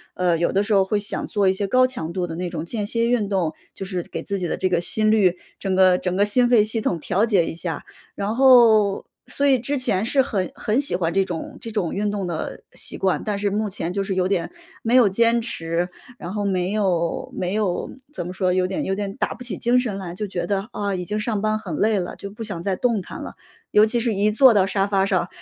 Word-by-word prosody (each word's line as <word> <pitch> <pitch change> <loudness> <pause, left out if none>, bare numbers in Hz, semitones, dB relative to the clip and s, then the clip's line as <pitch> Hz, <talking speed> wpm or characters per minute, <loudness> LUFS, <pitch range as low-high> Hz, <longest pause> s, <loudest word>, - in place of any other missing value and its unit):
呃， 180 -2 +2
有 170 - +1
的 200 +2 +2
时 210 0 -1
候 195 -1 +5
会 205 +2 0
想 200 - -3
做 200 -2 +1
一 190 - +4
些 200 +1 -2
高 255 +4 +4
强 205 -11 -4
度 180 0 -2
的 165 - -6
那 180 0 -3
种 165 -1 -5
间 210 +3 -3
歇 230 +3 0
运 220 -5 +1
动， 180 -5 0 0.2
就 195 - -6
是 185 -2 -3
给 - - -7
自 200 -1 -3
己 175 - -2
的 - - -2
这 185 - 0
个 175 -2 +1
心 215 +4 +2
率， 185 -5 +3 0.2
整 190 -2 -1
个 185 -1 +5
整 180 0 -2
个 200 +1 +3
心 240 +3 +3
肺 230 -4 +5
系 220 +1 -1
统 170 -5 -1
调 195 +6 0
节 190 -6 +3
一 - - -4
下。 165 -1 -5 0.3
然 205 +3 -2
后 230 -6 +5 0.2
所 285 - -1
以 265 -2 +5
之 275 +5 -2
前 220 -5 0
是 270 +3 +3
很 195 -9 -2
很 220 +5 0
喜 285 - +1
欢 170 -2 0
这 195 +2 +2
种 170 -3 -6
这 225 - -7
种 185 -6 -1
运 205 +1 -1
动 200 -3 -3
的 165 -2 -5
习 - - -2
惯， 190 -1 0
但 210 -2 -1
是 205 0 0
目 210 +2 -1
前 175 -2 -3
就 195 +1 -1
是 195 0 -2
有 185 0 +1
点 190 - -1 0.3
没 235 +2 0
有 235 -6 +6
坚 230 +4 +2
持， 170 -5 -2 0.3
然 175 - -6
后 205 -1 -2
没 185 -1 0
有 180 -6 -1
没 185 +2 -2
有 200 -5 -1 0.2
怎 175 - -4
么 - - -5
说， 185 -1 0
有 185 0 +1
点 190 - -3
有 190 - -1
点 200 0 -4
打 - - -1
不 250 - -10
起 215 -7 -3
精 245 +2 +2
神 225 -6 -2
来， 180 -3 -6
就 210 +3 -4
觉 180 -2 -3
得， 200 +1 -2
啊， 200 -1 -2
已 180 - -3
经 210 +4 -3
上 210 -2 -1
班 215 0 +1
很 185 -8 -6
累 215 0 +2
了， 180 -2 -3
就 200 - -8
不 215 +3 -8
想 195 -6 -5
再 190 0 -1
动 230 -2 0
弹 - - -9
了， - - -7 0.4
尤 210 - +6
其 235 +2 +2
是 230 -2 0
一 200 +2 +2
坐 245 +3 +6
到 200 -3 +4
沙 195 0 +1
发 200 -1 +1
上， 185 -2 +1
200 Hz, 285 characters per minute, -22 LUFS, 180-215 Hz, 0.4 s, 有